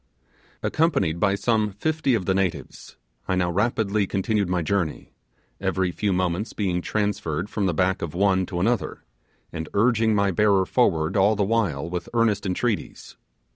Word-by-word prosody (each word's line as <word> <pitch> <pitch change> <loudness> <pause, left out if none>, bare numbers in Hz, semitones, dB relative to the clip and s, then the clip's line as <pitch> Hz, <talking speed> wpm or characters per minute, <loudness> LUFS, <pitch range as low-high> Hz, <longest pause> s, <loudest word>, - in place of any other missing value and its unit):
Accompanied 150 - +1
by 100 +1 +2
some 105 +1 +1
fifty 155 +4 0
of 95 -5 -2
the 95 - +2
natives, 95 -2 -3 0.3
I 95 - +1
now 90 -1 +1
rapidly 105 0 0
continued 100 0 0
my 90 -2 0
journey; 85 -2 -2 0.5
every 95 -1 0
few 100 +3 -1
moments 90 +3 -1
being 90 -4 -1
transferred 100 -4 -2
from 100 -3 0
the 90 - 0
back 95 +3 +1
of 85 -1 -5
one 95 -1 +2
to 90 -3 -4
another, 115 +4 -1 0.5
and 80 0 -5
urging 110 0 +3
my 100 -1 +2
bearer 100 0 +3
forward 90 -7 +1
all 100 +2 +4
the 100 - +1
while 100 -9 0
with 90 0 -5
earnest 110 -4 +1
entreaties. 105 +4 -3
100 Hz, 160 wpm, -24 LUFS, 90-105 Hz, 0.5 s, all